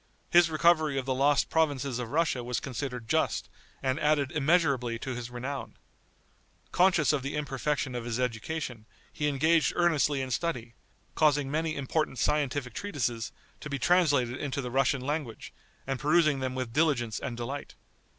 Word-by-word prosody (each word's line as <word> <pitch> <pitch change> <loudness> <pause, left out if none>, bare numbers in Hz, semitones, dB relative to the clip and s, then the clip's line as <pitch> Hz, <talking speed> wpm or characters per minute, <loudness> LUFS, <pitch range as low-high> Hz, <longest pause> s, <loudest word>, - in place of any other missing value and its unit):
His 175 -1 +6
recovery 155 -2 +3
of 130 - -2
the 130 - 0
lost 140 +2 +2
provinces 140 -5 +1
of 120 -2 -4
Russia 150 -3 +1
was 125 0 -2
considered 125 -3 -5
just, - - 0 0.3
and 130 +2 0
added 150 -3 +2
immeasurably 140 -6 +2
to 130 +3 -5
his 120 -1 -6
renown. 130 +3 -6 0.9
Conscious 175 -5 +4
of 145 - 0
the 140 +3 -4
imperfection 145 -1 -2
of 120 -1 -4
his 120 0 -2
education, 125 -1 -3 0.3
he 150 - -1
engaged 155 +2 +3
earnestly 150 -5 +2
in 130 - -5
study, 120 -5 -2 0.4
causing 145 -3 +2
many 155 +1 -1
important 140 0 -1
scientific 145 -3 0
treatises 125 - -3 0.3
to 150 - -7
be 140 - -2
translated 140 -6 +2
into 140 -1 -2
the 125 -3 -4
Russian 135 +1 +2
language, 145 -4 -4 0.3
and 135 -1 -2
perusing 150 -1 +3
them 130 -1 -3
with 130 -3 -4
diligence 130 -7 +1
and 120 -3 -5
delight. 135 +4 -5
140 Hz, 160 wpm, -29 LUFS, 125-155 Hz, 0.9 s, His